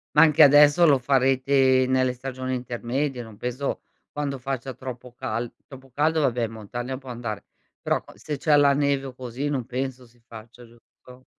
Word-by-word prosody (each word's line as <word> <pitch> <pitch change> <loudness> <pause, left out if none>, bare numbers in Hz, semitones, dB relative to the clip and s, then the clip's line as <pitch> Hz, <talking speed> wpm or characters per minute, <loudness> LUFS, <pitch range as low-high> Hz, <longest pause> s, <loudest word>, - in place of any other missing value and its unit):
Ma 150 - +7
anche 155 0 +4
adesso 145 +3 +7
lo 140 - +5
farete 130 0 +3
nelle 130 -1 +1
stagioni 130 0 -5
intermedie, 125 +2 -3
non 110 -3 -12
penso 125 +3 -3 0.3
quando 140 -2 -3
faccia 130 0 -4
troppo 125 -1 -9
cal 120 -2 -4
troppo 135 -1 -14
caldo 155 +4 +1
vabbè 125 -4 +1
in 110 - -7
montagna 120 +4 -6
può 130 -1 -12
andare, 115 -4 -5 0.4
però - - -1
qua - - -17
se 150 -2 -5
c'è 150 +2 +3
la 140 -1 +5
neve 140 -1 0
o 130 - -9
così, 130 +3 -5
non 130 -5 -2
penso 130 0 -4
si 120 +1 -27
faccia, 115 +1 -13
giusto? 125 +2 -19
130 Hz, 180 wpm, -24 LUFS, 120-140 Hz, 0.4 s, Ma